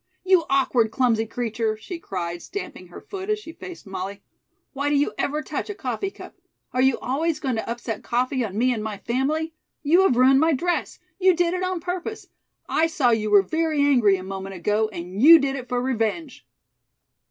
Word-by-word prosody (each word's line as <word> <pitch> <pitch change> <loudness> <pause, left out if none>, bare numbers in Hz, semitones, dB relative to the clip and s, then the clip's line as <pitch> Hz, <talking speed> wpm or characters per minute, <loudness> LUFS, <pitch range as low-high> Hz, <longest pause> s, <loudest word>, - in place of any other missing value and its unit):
"You 370 -3 +4
awkward, 255 -4 +2
clumsy 225 -1 +1
creature!" 225 -2 -2
she 340 - -7
cried, 175 - -5
stamping 405 - -7
her - - -11
foot 390 0 -7
as 425 - +2
she 375 -6 -10
faced 355 +1 -10
Molly. 195 +1 -6 0.5
"Why 285 +1 -1
do 290 - +2
you 285 +1 +1
ever 300 +2 -1
touch - - -4
a 415 - -4
coffee 265 - -3
cup? - - -12 0.4
Are 255 - +1
you 265 -1 +3
always 305 +5 -1
going 260 -3 -1
to 220 - -4
upset 235 -2 -4
coffee 255 +2 0
on 205 -2 -5
me 250 +2 +3
and 220 -3 -4
my 215 -2 -4
family? 295 +9 -1 0.3
You 330 +5 +5
have 385 -11 +3
ruined 265 +2 +6
my 320 +2 +3
dress. 350 +6 -1 0.2
You 370 -1 +5
did 345 0 +1
it 365 - -2
on 370 -2 -2
purpose. 360 +5 -4 0.4
I 320 - +2
saw 295 -8 +2
you 215 -2 +1
were 205 -2 +6
very 315 - -1
angry 245 -9 +4
a 185 - -6
moment 195 0 -6
ago 210 +5 0
and 185 +1 -6
you 330 +5 +10
did 275 -3 -1
it 255 -2 -7
for 245 - 0
revenge." 255 +4 -2
260 Hz, 200 wpm, -24 LUFS, 220-325 Hz, 0.5 s, you